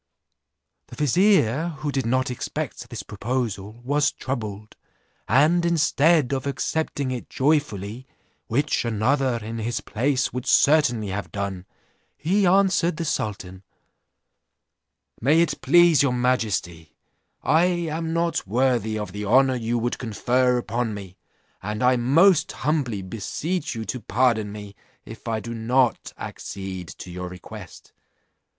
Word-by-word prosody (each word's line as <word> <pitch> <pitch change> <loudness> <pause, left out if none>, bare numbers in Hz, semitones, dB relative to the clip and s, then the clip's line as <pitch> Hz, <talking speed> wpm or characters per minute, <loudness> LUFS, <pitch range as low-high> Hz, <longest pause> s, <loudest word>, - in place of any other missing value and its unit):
The - - -11
vizier, 160 - +2
who 150 0 -3
did 135 -4 -1
not 130 +1 +1
expect 125 - -5
this - - -6
proposal, 110 -1 -4
was 145 +3 +2
troubled, 110 -5 -5 0.5
and 160 +6 +4
instead 160 -3 +3
of 135 +1 -2
accepting 140 +1 -2
it 125 -2 -5
joyfully, 130 -5 -1 0.4
which 140 +6 0
another 120 +3 +1
in 115 +1 -5
his 120 +4 -2
place 135 +2 -1
would 125 +1 -4
certainly 125 -8 +3
have 95 -4 -4
done, 100 -2 -4 0.5
he 190 +5 +2
answered 185 -3 +3
the 165 - -3
sultan: 95 - -3 1.6
'May 145 +7 +4
it 170 - +1
please 170 0 +5
your 140 -3 +2
majesty, 105 -10 -1 0.5
I 160 +3 +4
am 165 -2 -1
not 170 - -1
worthy 115 -1 +1
of 105 -4 -5
the 105 +2 -5
honour 130 +5 +4
you 120 0 -1
would 120 +1 -2
confer 125 +2 +1
upon 120 -2 -2
me, 95 -2 -9 0.5
and 105 +3 -3
I 125 +1 +5
most 155 +9 +4
humbly 130 -9 -1
beseech 120 - -3
you 110 -1 -4
to 125 - -4
pardon 110 -1 +1
me, 105 -1 -9 0.3
if - - -11
I 110 -1 -1
do 115 +2 -6
not 120 +2 +1
accede 95 -2 -6
to 90 - -10
your 90 0 -5
request. 90 0 -11
125 Hz, 130 wpm, -24 LUFS, 105-150 Hz, 1.6 s, please